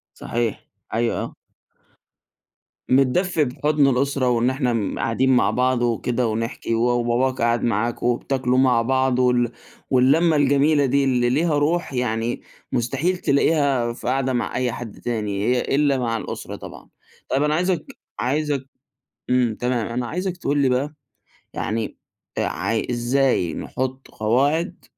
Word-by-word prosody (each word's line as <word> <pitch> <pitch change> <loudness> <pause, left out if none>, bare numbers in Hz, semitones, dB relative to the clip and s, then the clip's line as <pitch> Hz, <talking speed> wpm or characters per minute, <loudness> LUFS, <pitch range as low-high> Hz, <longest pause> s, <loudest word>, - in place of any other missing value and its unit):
صحيح. 115 -2 -3 0.3
أيوه، 115 +1 0
آه. - - -8 1.5
متدفّي 150 +6 +3
بحضن 145 +3 +1
الأسرة 135 0 +1
وإن 120 +1 +2
إحنا 125 -6 -1
قاعدين 130 +3 +2
مع 100 -5 +3
بعض 125 +2 +1
وكده 120 +1 0
ونحكي، 115 +1 -2
و 115 - +1
وباباك 120 +2 +1
قاعد 120 0 +2
معاكم 115 +1 0
وبتاكلوا 125 +1 0
مع 125 -3 +4
بعض 130 0 +1
وال 125 -2 +2 0.4
واللمّة 145 +6 +4
الجميلة 145 +1 +3
دي، 140 +2 +2
اللي 125 -2 +2
ليها 150 +3 +2
روح 155 +1 0
يعني 120 -1 -1 0.3
مستحيل 135 +9 0
تلاقيها 140 -5 +2
في 120 - -6
قعدة 130 0 +1
مع 120 - -2
أي 125 -1 0
حد 115 -3 -8
تاني، 105 -4 -2
هي 125 +2 +2
إلّا 140 -2 +3
مع 115 -2 -1
الأسرة - - -6
طبعًا. - - -11 0.4
طيب، 135 - +2
أنا 150 +1 +2
عايزَك 180 -1 0 0.3
عايزَك 140 +1 -1 0.6
إمم، 125 -3 +2
تمام، 125 -3 0
أنا 120 +1 -3
عايزَك 180 +5 -3
تقول 145 -4 -1
لي 140 -2 +3
بقى، 135 +4 0 0.6
يعني 110 0 -3 0.4
عاي 100 +6 -1
إزاي 120 - +1
نحط 130 +1 -4
قواعد 140 - 0
125 Hz, 135 wpm, -22 LUFS, 120-140 Hz, 1.5 s, مع